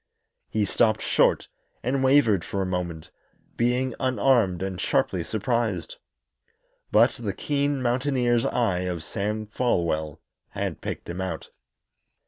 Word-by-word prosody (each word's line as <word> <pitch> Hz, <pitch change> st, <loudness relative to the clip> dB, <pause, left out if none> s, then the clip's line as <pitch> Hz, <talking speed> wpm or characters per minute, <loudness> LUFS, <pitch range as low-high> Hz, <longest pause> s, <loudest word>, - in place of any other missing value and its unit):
He 110 Hz, -2 st, +1 dB
stopped 110 Hz, +2 st, +2 dB
short -, -, +2 dB, 0.4 s
and 130 Hz, +2 st, 0 dB
wavered 130 Hz, -9 st, +4 dB
for 100 Hz, -1 st, -2 dB
a -, -, -2 dB
moment, 90 Hz, -3 st, -4 dB, 0.4 s
being 125 Hz, +2 st, +1 dB
unarmed 120 Hz, -7 st, +2 dB
and 95 Hz, -2 st, -4 dB
sharply 90 Hz, -3 st, +1 dB
surprised. 115 Hz, -, -1 dB, 0.9 s
But -, -, +4 dB
the -, -, -2 dB
keen 145 Hz, -2 st, -1 dB
mountaineer's 125 Hz, -1 st, +1 dB
eye 100 Hz, -7 st, +1 dB
of 90 Hz, -3 st, -3 dB
Sam 105 Hz, +5 st, -3 dB
Folwell 85 Hz, -, -1 dB, 0.3 s
had -, -, -3 dB
picked -, -, -5 dB
him 85 Hz, +2 st, -4 dB
out. 90 Hz, -4 st, -4 dB
110 Hz, 120 wpm, -25 LUFS, 90-125 Hz, 0.9 s, wavered